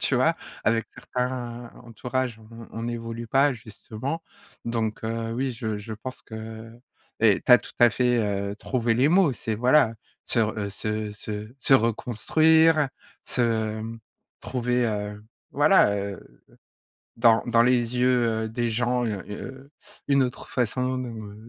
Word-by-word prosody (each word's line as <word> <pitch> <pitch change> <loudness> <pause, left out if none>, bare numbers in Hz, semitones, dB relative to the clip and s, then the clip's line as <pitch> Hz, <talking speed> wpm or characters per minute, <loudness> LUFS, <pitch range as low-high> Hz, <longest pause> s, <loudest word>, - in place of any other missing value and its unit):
tu - - +1
vois? - - +3 0.3
Avec 115 0 +2
certains 120 -1 -4
entourages, 125 0 -3
on 110 +1 -17
on - - -12
on - - -4
n'évolue 115 0 -5
pas 135 +4 +3
justement. 115 +6 -6 0.4
Donc, 115 +1 -2
heu, 115 0 -3
oui, 130 +2 -1
je 110 -3 -3
je 110 +2 -7
pense 130 +5 -8
que 110 0 -8 0.5
et 110 -3 +4
tu 125 - +4
as 125 - +10
tout - - -12
à 120 - +7
fait, 125 +1 +2
heu, 100 -1 -1
trouvé 120 0 0
les 130 +5 +3
mots, 175 -4 +4
c'est 110 -2 -3
voilà, 125 +1 +4 0.3
se 115 - +1
re 110 0 0
heu, 100 -1 -3
se 105 +1 -3
se 105 0 -6
se 135 - +5
reconstruire, 155 +7 +3 0.4
se, 125 - -1
hem, 110 0 -1 0.4
trouver, 125 -1 0
heu, 105 -1 -4 0.3
voilà, 145 - +5
heu, 100 -1 -7 0.7
dans 115 -1 +5
dans 115 -1 +4
les 125 0 +2
yeux, 120 -3 +2
heu, 110 - -3
des 120 +1 -1
gens, 120 +2 0
heu, 125 +7 -7 0.4
une 140 -1 +4
autre 125 0 -5
façon, 130 +1 -1
heu, 110 -4 -8
115 Hz, 155 wpm, -25 LUFS, 110-125 Hz, 0.7 s, as